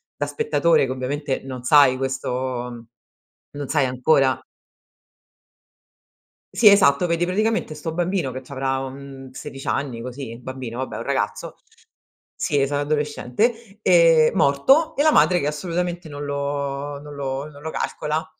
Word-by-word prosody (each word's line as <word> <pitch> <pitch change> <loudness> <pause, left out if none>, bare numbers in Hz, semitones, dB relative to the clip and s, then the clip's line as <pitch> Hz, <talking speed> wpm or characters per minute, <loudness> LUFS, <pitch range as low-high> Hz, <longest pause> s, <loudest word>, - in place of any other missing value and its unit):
da - - -2
spettatore, 170 - +2
che - - -4
ovviamente 135 +2 -3
non 130 -2 -7
sai 140 0 +5
questo 125 -2 -3 0.6
non 145 -1 -6
sai 145 0 +2
ancora 130 +1 +2 2.1
Sì 220 - +5
esatto, 180 -6 +6
vedi 170 0 +1
praticamente 215 -3 0
sto 160 +2 -5
bambino 175 -5 -1
che 130 - -6
c'avrà, 135 0 -2
uhm, 135 0 -8
16 135 +1 -9
anni, 125 -5 -2
così 125 -1 -7
un 115 - -12
bambino 130 -2 -6
vabbè 130 - -4
è - - -4
un - - -5
ragazzo - - -2 0.8
sì 145 -1 0
esat 145 +1 0
adolescente, 155 - -1
ehm, 165 -4 +5
morto 265 - +3
e 290 - +2
la 310 - +5
madre 175 - +4
che 140 - -1
assolutamente 175 +3 -3
non 145 -1 -7
lo 140 0 -3
non 145 0 -10
lo 135 0 -4
non 145 -1 -14
lo 160 +1 -5
calcola, 155 +1 -2
145 Hz, 145 wpm, -22 LUFS, 130-165 Hz, 2.1 s, esatto